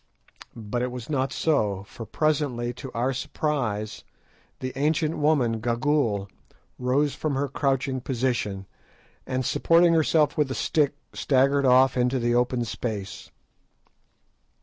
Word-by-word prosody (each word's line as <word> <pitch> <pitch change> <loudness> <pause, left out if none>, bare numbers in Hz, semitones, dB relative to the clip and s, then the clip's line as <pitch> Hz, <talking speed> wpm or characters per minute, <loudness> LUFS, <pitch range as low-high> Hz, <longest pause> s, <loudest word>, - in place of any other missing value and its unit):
But 115 +2 -4
it 125 - -1
was 125 +3 -7
not 135 -2 0
so, 105 -13 0
for 110 +2 -10
presently, 140 -6 0
to 130 +1 -9
our 125 +3 0
surprise, 120 -7 -2 0.6
the 130 0 -4
ancient 155 +3 +1
woman, 135 -7 +2
Gagool, 120 -3 0 0.5
rose 135 +3 +1
from 155 -3 -2
her 140 +1 0
crouching 135 -1 -1
position, 115 -7 -2 0.6
and 130 0 -2
supporting 170 +5 +4
herself 155 -2 +3
with 145 -3 +2
a 130 - -3
stick, 145 -2 +1 0.2
staggered 135 0 +2
off 130 +1 +5
into 125 +1 +2
the 120 -1 0
open 120 0 +1
space. 105 -3 -5
130 Hz, 125 wpm, -25 LUFS, 120-145 Hz, 0.6 s, off